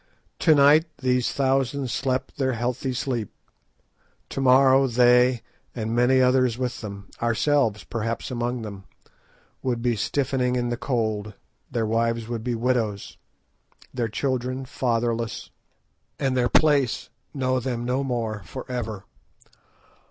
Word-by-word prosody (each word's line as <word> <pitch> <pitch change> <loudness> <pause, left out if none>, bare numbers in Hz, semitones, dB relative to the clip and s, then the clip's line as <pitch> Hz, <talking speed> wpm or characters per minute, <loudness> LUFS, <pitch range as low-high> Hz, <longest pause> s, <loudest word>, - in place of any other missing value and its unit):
To 160 -3 +5
night 145 +3 +6
these 125 -2 +1
thousands 135 -1 0
slept 130 +4 -2
their 130 -2 0
healthy 125 +3 -2
sleep, 125 -4 -3 1.0
to 135 - -3
morrow 135 +1 +5
they, 125 0 +4 0.3
and 115 -1 -2
many 125 +2 +4
others 130 -2 +3
with 125 -1 -3
them, 100 -2 -8
ourselves 120 -2 +1
perhaps 115 +2 -4
among 120 -1 -2
them, 100 -3 -8 0.8
would 120 -3 -2
be 120 -2 +2
stiffening 125 +2 0
in 120 -1 0
the 120 - -1
cold; 110 -5 -2 0.3
their 115 -2 -1
wives 115 +1 0
would 115 -2 -4
be 120 0 -1
widows, 115 -4 -1 0.8
their 120 -3 -1
children 130 +2 -2
fatherless, 115 -3 -2 0.7
and 135 -2 0
their 120 -1 +2
place 145 -4 +2 0.2
know 130 -2 0
them 120 -1 -3
no 130 +3 0
more 115 -5 -2
for 130 - -8
ever. 110 -5 -4
125 Hz, 130 wpm, -24 LUFS, 115-130 Hz, 1.0 s, night